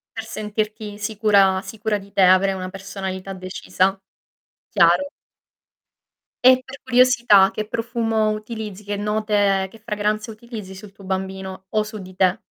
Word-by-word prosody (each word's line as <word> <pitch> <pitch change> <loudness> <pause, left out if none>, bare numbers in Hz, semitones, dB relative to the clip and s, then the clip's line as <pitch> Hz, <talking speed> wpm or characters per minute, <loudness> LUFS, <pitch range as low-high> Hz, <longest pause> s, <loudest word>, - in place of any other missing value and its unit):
Per 225 -1 -5
sentirti 215 -1 -4
sicura 205 -3 +3
sicura 220 -1 -2
di 200 0 -13
te 200 - +2
avrei 185 +1 +5
una 185 -1 -5
personalità 195 0 -6
decisa. 185 +1 -1 0.7
Chiaro. 285 0 +4 1.4
E, 255 0 +7
per 265 +1 -10
curiosità, 245 -6 +5
che 215 - -4
profumo 225 -2 0
utilizzi, 215 -2 -6
che 205 0 -3
note, 205 -2 +1
che 225 - -15
fragranze 215 0 -2
utilizzi 215 -3 -9
sul 195 +1 -11
tuo 195 0 -15
bambino 190 0 -5
o 215 0 +1
su 215 0 -8
di 185 -1 -11
te? 185 +1 +3
210 Hz, 140 wpm, -22 LUFS, 190-220 Hz, 1.4 s, E